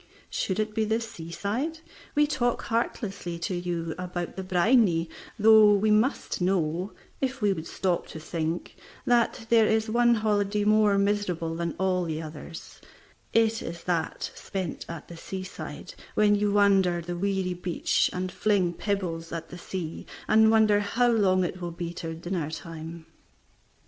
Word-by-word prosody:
Should 190 +1 -1
it 215 0 -1
be 220 0 +1
the 220 +1 +1
seaside, 225 - -4 0.3
we 295 0 +5
talk 245 -5 0
heartlessly 200 -6 -2
to 190 - -1
you 175 -2 -2
about 175 -1 -4
the 190 - -4
"briny," 185 -2 +3 0.3
though 215 -1 +7
we 210 +2 +2
must 215 -1 +1
know, 180 0 0 0.3
if 265 0 -2
we 205 -3 +3
would 160 -3 -6
stop 180 -3 -1
to 160 - -8
think, 160 +1 -3 0.3
that 240 -2 +2
if 225 - -19
there 225 -2 +5
is 220 0 +1
one 240 +1 +4
holiday 210 -1 +1
more 210 -1 +4
miserable 195 -5 0
than 170 0 -3
all 185 -1 +1
the 160 -1 -3
others, 160 +1 -9 0.5
it 225 0 +3
is 170 0 -6
that 170 -3 -2
spent 190 -4 -5
at 170 -3 -7
the 170 - -10
seaside, 185 +2 -7 0.2
when 210 -1 +4
you 205 0 +2
wander 195 -4 +4
the 175 +1 -5
weary 190 0 -1
beach 175 -1 0
and 185 0 -3
fling 190 -4 +1
pebbles 175 -4 -3
at 165 -1 -5
the 175 - -8
sea, 170 -3 -6 0.2
and 220 0 +6
wonder 215 -2 +5
how 235 +4 +2
long 190 -5 +3
it 180 +1 -4
will 175 - -3
be 170 0 -5
till 165 -1 -5
dinner 170 -2 -3
time. 165 0 -8
190 Hz, 160 wpm, -27 LUFS, 170-215 Hz, 0.5 s, though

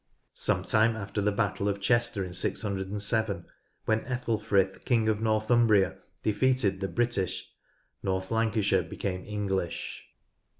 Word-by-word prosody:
Some - - 0
time 110 +1 +3
after 105 -1 -3
the 105 +1 +2
battle 100 -1 0
of 100 0 -2
Chester 120 -1 +1
in 90 - -8
607, 100 +1 0 0.4
when 110 0 +1
Ethelfrith, 110 -6 0
King 115 -3 +2
of 110 -1 +1
Northumbria, 110 -2 +3 0.2
defeated 110 -2 +2
the 95 - 0
British, 115 -5 -1 0.5
North 95 0 -2
Lancashire 110 -4 +2
became 90 +2 -4
English. 100 -4 -3
105 Hz, 120 wpm, -28 LUFS, 95-115 Hz, 0.5 s, time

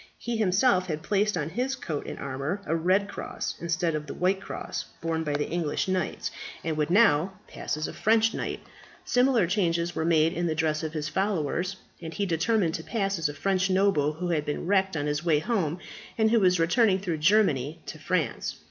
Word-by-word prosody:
He 240 -1 -3
himself 190 -1 +3
had 155 -2 -3
placed 205 -1 +1
on 150 -1 -2
his 255 +7 -1
coat 160 - -5
and - - -6
armour 140 +9 -4
a 160 - 0
red 185 +5 +2
cross, 205 - -5
instead 170 0 0
of 150 -1 -3
the - - -6
white 190 +2 +1
cross - - -5
borne 165 -1 -1
by 150 -2 -2
the 145 0 -1
English 165 -1 -1
knights, 185 0 -2 0.3
and 160 -1 -1
would 150 0 0
now 185 -3 +4
pass - - -4
as 155 - -2
a - - -7
French 225 +1 +3
knight. - - -4 0.4
Similar 250 -5 +3
changes 170 -2 0
were - - -1
made 165 0 +3
in 175 -1 -1
the 160 - -1
dress 155 -1 0
of 160 -1 -4
his 155 -1 -2
followers, 185 0 -1 0.3
and 165 -1 -7
he 200 - 0
determined 175 +1 +1
to 160 - -4
pass 195 -4 -1
as 160 -2 +1
a - - -5
French 190 +3 +1
noble 185 -6 +2
who 175 +3 -4
had 155 -3 +1
been 150 +2 -3
wrecked 190 -2 +2
on 145 - -1
his 150 +2 -1
way 165 -3 +3
home, 170 -1 -1 0.4
and 220 -1 +3
who 230 - +5
was 180 -3 +3
returning 185 +4 +3
through 180 -5 -3
Germany 155 -5 +3
to 155 - -8
France. 165 0 -1
170 Hz, 210 wpm, -27 LUFS, 155-195 Hz, 0.4 s, who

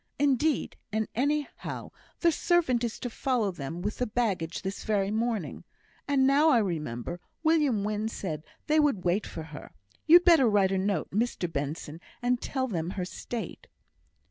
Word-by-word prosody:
Indeed, 285 +1 +1
and 220 +1 0
anyhow, 285 +4 -2 0.3
the 340 - +5
servant 315 -8 +2
is 235 -1 -2
to - - -2
follow 235 -5 0
them 165 +1 -6
with 210 +2 -3
the 250 - 0
baggage 200 -8 -1
this 190 +1 -4
very 200 -2 0
morning; 220 -6 -2 0.4
and 275 -2 +3
now 285 +4 +5
I 265 - +5
remember, 165 - -2 0.2
William 300 -10 +3
Wynn 210 +1 -1
said 160 -8 -5 0.2
they 310 0 +3
would 280 -12 +2
wait 180 +4 +1
for 160 - -6
her. 150 -2 -10 0.3
You'd 350 +3 +8
better 320 -9 +6
write 200 -2 +3
a 190 - +1
note, 195 +1 -1
Mr 205 -5 -1
Benson, 150 +3 -4 0.2
and 245 0 0
tell 260 -1 -2
them 170 -7 -2
her 180 - -1
state." 230 +5 -6
220 Hz, 165 wpm, -28 LUFS, 180-270 Hz, 0.4 s, You'd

